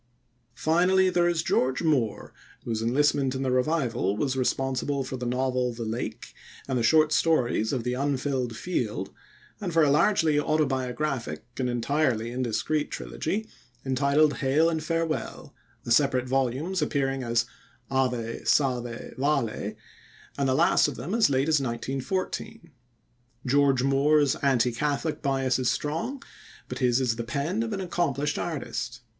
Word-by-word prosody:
Finally 180 +6 +3
there 175 -1 +3
is 170 -2 0
George 130 +5 +1
Moore, 130 -10 0 0.3
whose 115 -2 -2
enlistment 135 +2 +2
in 135 - -2
the 130 - 0
Revival 125 - 0
was 130 +3 0
responsible 135 +1 -1
for 130 - -5
the 125 -1 -4
novel 125 0 0
The 115 0 -5
Lake 115 +3 -5 0.3
and 130 - -1
the 120 - +1
short 155 +6 +4
stories 130 -9 +2
of 125 -4 -2
The 125 +1 -1
Unfilled 130 -2 -1
Field, 110 - -3 0.5
and 195 -5 -3
for 165 -1 +4
a 145 - +4
largely 160 -1 +3
autobiographic 135 - -1 0.2
and 125 -1 0
entirely 120 -1 0
indiscreet 130 +5 -1
trilogy 215 +7 -3 0.4
entitled 140 +3 +2
Hail 150 +5 +2
and 160 -1 -2
Farewell, 165 0 -3 0.3
the 120 - -5
separate 130 0 +3
volumes 135 +8 0
appearing 135 -3 0
as 115 -1 +1 0.5
Ave, 125 -4 -1
Salve, 125 -4 0
Vale, 140 -5 -1 0.6
and 140 -1 0
the 130 - +2
last 165 +4 +4
of - - -4
them 140 - -5
as 230 -8 +4
late 135 +1 +1
as 155 -3 +3
1914. 135 - -4 0.7
George 135 -1 +3
Moore's 140 +1 +3
anti 125 -3 +2
Catholic 145 +5 -2
bias 135 -2 +1
is 125 -2 +1
strong, 160 - -3 0.4
but - - -6
his 125 -1 +3
is 120 -3 0
the 115 - -3
pen 145 - -2
of 230 0 -2
an 195 -2 -3
accomplished 170 -5 -1
artist. 125 -7 -4
135 Hz, 145 wpm, -26 LUFS, 125-155 Hz, 0.7 s, short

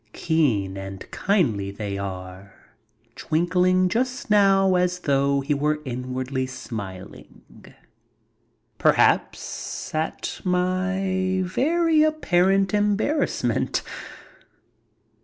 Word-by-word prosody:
Keen 115 - 0
and 95 0 -7
kindly 130 - 0
they 100 0 -5
are, 95 0 -7 0.6
twinkling 180 +3 +2
just 255 +4 -2
now 195 -2 +4
as 180 0 +1
though 140 -1 +1
he 145 +2 0
were 150 +2 +1
in 125 0 -5
wardly 130 0 -2
smiling, 100 -7 -8 1.4
perhaps - - +1
at 155 +1 -3
my 185 +1 0
very 320 - +2
apparent 195 - +2
embarrassment. 210 +8 0
180 Hz, 85 wpm, -24 LUFS, 125-195 Hz, 1.4 s, now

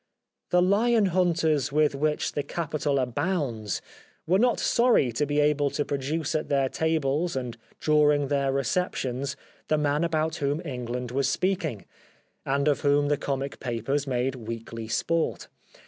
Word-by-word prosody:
The 180 0 +4
Hon 210 +2 +3
hunters 160 -6 +2
with 150 0 +3
which 150 +2 0
the 145 - -1
capital 150 -1 -2
abounds 130 - -1 0.4
were 185 +4 +3
not 245 0 +3
sorry 235 - +3
to 145 +6 -1
be 145 +1 +1
able 145 -1 +3
to 145 - -2
produce 145 +3 -2
at 155 - -2
their 135 -2 +2
tables 160 +1 0
and 125 -3 -3 0.2
during 150 -2 +3
their 140 -1 +1
receptions 140 -2 -1 0.3
the 155 - +2
man 150 +1 +1
about 160 0 0
whom 145 +1 0
England 125 -3 -4
was 135 +1 +1
speaking, 170 - -1 0.6
and 140 +2 +1
of 145 - +2
whom 145 0 +3
the 145 - +2
comic 140 0 -3
papers 130 +4 -2
made 130 0 0
weekly 115 -1 -6
sport. 165 +9 -1
145 Hz, 145 wpm, -26 LUFS, 135-160 Hz, 0.6 s, The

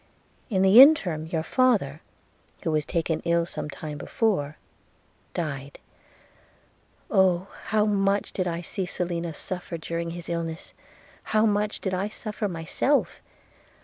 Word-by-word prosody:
In 190 -4 +2
the 195 +6 +9
interim 180 - +5
your 160 -1 -2
father, 200 - +1 0.6
who 165 - 0
was 155 -1 0
taken 165 -1 -1
ill 170 0 +2
some 160 - -5
time 150 0 -7
before, 155 -7 -1 0.8
died. 140 -4 -4 0.7
– - - -31
Oh! 190 0 +3 0.2
how 215 0 +2
much 200 -1 +1
did 185 -2 -1
I 170 0 -2
see 185 +1 -4
Selina 170 -2 -3
suffer 175 +2 -4
during 170 +1 -4
his 170 0 -7
illness 165 -1 -4 0.3
– - - -27
how 215 - +5
much 210 0 0
did 190 - -2
I 190 +2 0
suffer 215 0 -4
myself! 180 - 0
175 Hz, 140 wpm, -26 LUFS, 160-200 Hz, 0.8 s, the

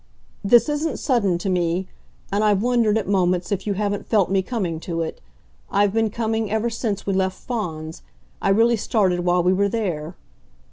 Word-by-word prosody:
"This 235 +3 +5
isn't 300 +2 -1
sudden 210 - +1
to 185 - -5
me, 180 0 0 0.4
and 205 +2 +1
I've 205 -1 +2
wondered 235 -3 +2
at 215 - -2
moments 180 -2 +1
if 195 0 -2
you 200 - 0
haven't 205 0 -2
felt 200 -5 +2
me 195 -1 +3
coming 185 -6 -3
to 165 0 -3
it. 160 - -6 0.5
I've 200 0 +2
been 225 -1 +2
coming 220 0 -2
ever 220 +2 0
since 220 -3 -3
we 195 - 0
left 190 0 0
Fawns 160 -10 -5 0.4
I - - +1
really 230 +4 +4
started 195 -4 +1
while 175 0 +2
we 180 +1 +3
were 200 +2 +2
there." 185 -9 -3
200 Hz, 185 wpm, -22 LUFS, 180-225 Hz, 0.5 s, This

